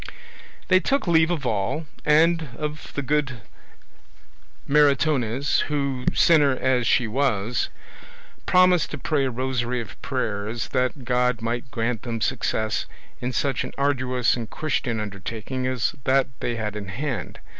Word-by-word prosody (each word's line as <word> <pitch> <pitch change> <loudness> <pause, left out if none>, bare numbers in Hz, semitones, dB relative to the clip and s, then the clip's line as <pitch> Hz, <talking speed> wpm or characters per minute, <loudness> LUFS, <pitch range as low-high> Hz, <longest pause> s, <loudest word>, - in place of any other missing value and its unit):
They 185 0 +5
took 275 - 0
leave 160 -2 +4
of 160 -6 -2
all, 110 +8 -1 0.2
and 160 0 +4
of 150 0 -5
the 145 - -2
good 140 -4 -1 1.3
Maritornes, 140 -3 +3
who, 140 -3 -2
sinner 150 -5 +5
as 125 -3 +1
she 125 - +3
was, 120 -2 0 0.8
promised 180 -2 +4
to - - -5
pray 145 -4 0
a - - 0
rosary 125 -1 -1
of 115 -5 -8
prayers 110 -3 -3
that 130 0 -1
God 125 -1 +1
might 120 +3 -2
grant 115 -2 -2
them 115 -2 -4
success 110 -2 -1 0.3
in 125 - -2
such 135 +1 0
an - - -7
arduous 130 -3 +1
and 115 -3 -5
Christian 125 -7 -1
undertaking 110 +5 -4
as 130 +2 0
that 135 0 +3
they 120 - -2
had 105 -2 -3
in 105 -2 -5
hand. 125 +6 -4
130 Hz, 140 wpm, -24 LUFS, 115-145 Hz, 1.3 s, They